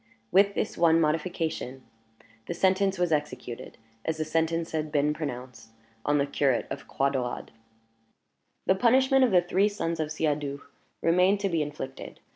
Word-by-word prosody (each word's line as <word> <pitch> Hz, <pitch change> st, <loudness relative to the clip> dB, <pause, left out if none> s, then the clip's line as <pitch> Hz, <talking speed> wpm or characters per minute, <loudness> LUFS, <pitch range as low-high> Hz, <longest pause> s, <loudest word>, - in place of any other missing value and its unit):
With 200 Hz, +1 st, +4 dB
this -, -, -2 dB
one 165 Hz, -1 st, +5 dB
modification, 155 Hz, -4 st, -1 dB, 0.6 s
the 175 Hz, -, -3 dB
sentence 190 Hz, +1 st, +2 dB
was 175 Hz, -1 st, +1 dB
executed, 130 Hz, -6 st, -3 dB, 0.3 s
as 160 Hz, -1 st, -2 dB
the 155 Hz, -, -2 dB
sentence 165 Hz, +1 st, 0 dB
had 155 Hz, -1 st, -2 dB
been 150 Hz, 0 st, +2 dB
pronounced, 125 Hz, -6 st, -7 dB, 0.3 s
on 145 Hz, 0 st, +2 dB
the 140 Hz, -, +2 dB
curate 140 Hz, -3 st, +1 dB
of -, -, -6 dB
Croix 140 Hz, 0 st, 0 dB
Daurade. 125 Hz, -3 st, -3 dB, 1.1 s
The -, -, +5 dB
punishment 260 Hz, +6 st, +4 dB
of 255 Hz, -, +4 dB
the 180 Hz, -3 st, +4 dB
three 190 Hz, +4 st, +2 dB
sons 170 Hz, -5 st, -3 dB
of 155 Hz, -1 st, -2 dB
Siadoux 145 Hz, -3 st, -2 dB, 0.4 s
remained 180 Hz, +4 st, +4 dB
to 200 Hz, -, +1 dB
be 165 Hz, -3 st, 0 dB
inflicted. 145 Hz, -3 st, -6 dB
160 Hz, 155 wpm, -27 LUFS, 145-185 Hz, 1.1 s, one